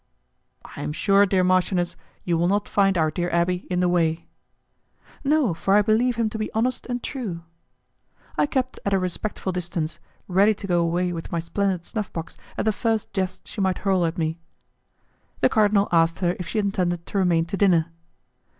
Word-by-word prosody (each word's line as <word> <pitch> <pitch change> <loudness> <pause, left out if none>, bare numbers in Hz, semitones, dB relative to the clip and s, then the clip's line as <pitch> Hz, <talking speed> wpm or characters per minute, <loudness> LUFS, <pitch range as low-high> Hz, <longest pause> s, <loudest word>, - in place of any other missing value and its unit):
"I - - -6
am 150 - -3
sure, 200 +4 +4
dear 185 -1 +2
marchioness, 180 -1 +1 0.3
you 175 - 0
will 170 +1 +2
not 205 +2 +1
find 195 -2 +2
our 155 -1 +2
dear 175 +2 -2
abbé 175 +2 0
in 180 -1 0
the 180 - +3
way." 170 -2 +1 1.0
"No, 285 - +2
for 195 +4 +1
I 210 - +5
believe 230 +3 +2
him 230 -1 +1
to 220 - -5
be 215 - -3
honest 245 +3 -1
and 245 -1 -3
true." 200 -11 -5 0.9
I - - +2
kept 260 -3 -2
at 200 - 0
a - - +4
respectful 190 +1 -3
distance, 170 -3 -3 0.3
ready 200 +4 +4
to 195 - -8
go 175 -3 +2
away 175 +1 0
with 165 -1 -6
my 170 - -1
splendid 180 +1 -1
snuff 210 -3 -4
box 165 -1 -6 0.2
at - - -1
the 220 - +4
first 220 0 -1
jest 185 -2 -3
she 210 - -5
might 190 -1 +1
hurl 190 -2 +3
at 165 +2 -1
me. 160 0 -1 1.0
The - - +5
cardinal 210 -2 +3
asked 165 -1 +3
her 175 -2 0
if 180 - -5
she - - -3
intended 180 -4 0
to 200 - -2
remain 170 -3 +2
to 170 - -4
dinner. 170 -5 +3
185 Hz, 195 wpm, -24 LUFS, 170-205 Hz, 1.0 s, I